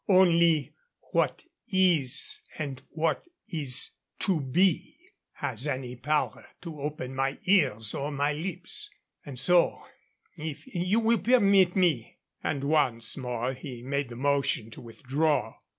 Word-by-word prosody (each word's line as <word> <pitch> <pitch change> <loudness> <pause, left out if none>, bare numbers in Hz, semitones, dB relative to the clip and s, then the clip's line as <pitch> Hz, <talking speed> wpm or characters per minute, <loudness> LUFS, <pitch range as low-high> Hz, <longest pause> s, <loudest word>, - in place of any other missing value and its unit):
Only 170 -5 +4 0.4
what - - +1 0.3
is 175 -9 +2 0.2
and 140 -4 -4
what 165 +1 0 0.2
is 145 -7 -3 0.3
to 185 -5 +2
be 170 +6 +1 0.4
has 120 +7 -3
any 130 -3 -3
power 150 +5 -1
to 160 -5 -8
open 145 -3 -4
my 135 +1 -1
ears 130 - +2
or 145 +2 -3
my 145 +1 0
lips. 165 +4 -4 0.3
And 140 -3 -8
so, 170 +7 +3 0.5
if 155 -2 -6
you 200 -2 0
will 230 +1 +3
permit 200 -7 +4
me," 170 - +1 0.3
and 140 - -1
once 135 -6 +1
more 125 -1 -2
he 125 -2 -8
made 140 0 -2
the 120 - -8
motion 135 -4 +1
to - - -10
withdraw. 135 +6 -1
145 Hz, 130 wpm, -28 LUFS, 130-175 Hz, 0.5 s, Only